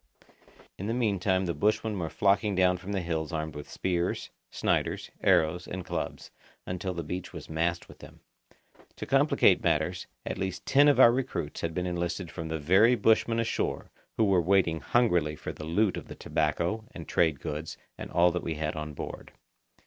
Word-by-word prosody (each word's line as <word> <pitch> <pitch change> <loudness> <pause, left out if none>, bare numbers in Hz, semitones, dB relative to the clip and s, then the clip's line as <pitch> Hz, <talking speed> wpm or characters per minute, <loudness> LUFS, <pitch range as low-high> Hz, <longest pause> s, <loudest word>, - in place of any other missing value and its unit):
In 100 - -4
the 115 - -1
meantime 100 -5 +1
the 85 - -1
bushmen 110 0 0
were 80 -2 -2
flocking 100 +2 +2
down 90 0 +3
from 90 +3 -8
the 100 -2 -1
hills 80 -1 -2
armed 80 -1 -3
with 75 0 -8
spears, 90 -1 -2 0.2
Sniders, - - -1
arrows, 90 -1 +2
and 90 0 -6
clubs, - - -5 0.3
until 90 0 -4
the 85 - -3
beach 90 +4 -5
was - - -9
massed 85 +2 -1
with - - -15
them. - - -13 0.8
To - - -6
complicate - - +4
matters, 85 +2 0 0.2
at - - -4
least 95 0 -4
ten 145 +2 +5
of 145 - +4
our 120 - +9
recruits 120 - -3
had 80 -1 -3
been 90 - -1
enlisted 85 0 -3
from 80 - -6
the 80 0 -2
very 95 +11 +5
bushmen 115 0 +2
ashore 115 - -2 0.3
who 115 - +3
were 95 -4 +4
waiting 85 -2 +2
hungrily 90 -11 +2
for - - -6
the 75 - -8
loot 95 +5 +1
of - - -7
the - - -9
tobacco 85 +8 -1
and 85 -4 -8
trade 80 -5 +2
goods 75 +1 -5 0.2
and - - -8
all 90 +1 +4
that 90 - -2
we 80 - -3
had 75 0 -3
on 75 -1 -5
board. - - -7
90 Hz, 185 wpm, -28 LUFS, 80-100 Hz, 0.8 s, our